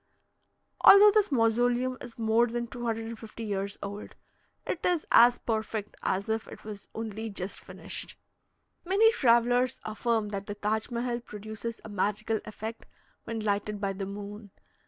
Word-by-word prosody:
Although 410 +1 +10
this 415 -4 +2
mausoleum 245 +1 +2
is 240 -2 -9
more 225 +1 +3
than 240 0 -2
250 230 -1 -5
years 200 -2 -3
old, 200 +1 -7 0.5
it 350 - -3
is 350 -3 +1
as 240 +1 +7
perfect 220 -2 -3
as 195 +3 -1
if 220 0 -1
it - - -11
was 210 -2 -8
only 220 0 -4
just 195 -1 -4
finished. - - -7 0.7
Many 405 +5 +5
travellers 245 - +3
affirm 220 0 -1
that 200 -1 -5
the 205 - -4
Taj 215 +1 -1
Mehal 240 0 -2
produces 220 +2 -7
a - - -7
magical 210 +2 -1
effect 220 +1 -7 0.4
when 225 -1 -3
lighted 205 0 -1
by 200 -1 -1
the 195 0 -5
moon. 205 +1 -8
225 Hz, 145 wpm, -29 LUFS, 210-240 Hz, 0.7 s, Although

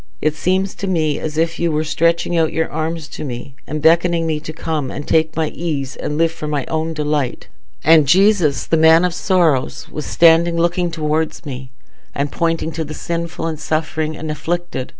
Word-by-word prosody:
It 155 - +1
seems 185 +4 0
to 200 - -5
me 155 -5 0
as 155 -1 -5
if 165 +1 0
you 170 -1 +1
were 155 0 0
stretching 170 +2 +1
out 160 -2 +2
your 160 0 0
arms 160 0 -3
to - - -7
me, 125 -1 -6
and 155 0 -4
beckoning 170 +1 +4
me 155 -2 -1
to 155 +1 -7
come 155 -3 -3
and 145 - -7
take 160 0 +2
my 160 -2 0
ease 150 -5 -4
and 150 - -4
live 165 0 +2
for 160 -2 -6
my 145 -3 -1
own 160 0 -2
delight, 150 -4 -2 0.3
and 155 -2 +6
Jesus, 175 - +3
the 165 - +1
Man 160 +2 +6
of 180 - -1
Sorrows, 170 -8 +1
was 150 - -5
standing 170 0 +4
looking 175 +1 +1
towards 160 0 -2
me, 130 -2 -7 0.5
and 140 +1 -1
pointing 165 -1 -1
to 160 +1 -3
the 155 0 -7
sinful, 170 0 -4
and 160 -2 -3
suffering, 155 0 -2
and 155 -1 -4
afflicted. 165 -2 -3
160 Hz, 195 wpm, -18 LUFS, 150-170 Hz, 0.5 s, and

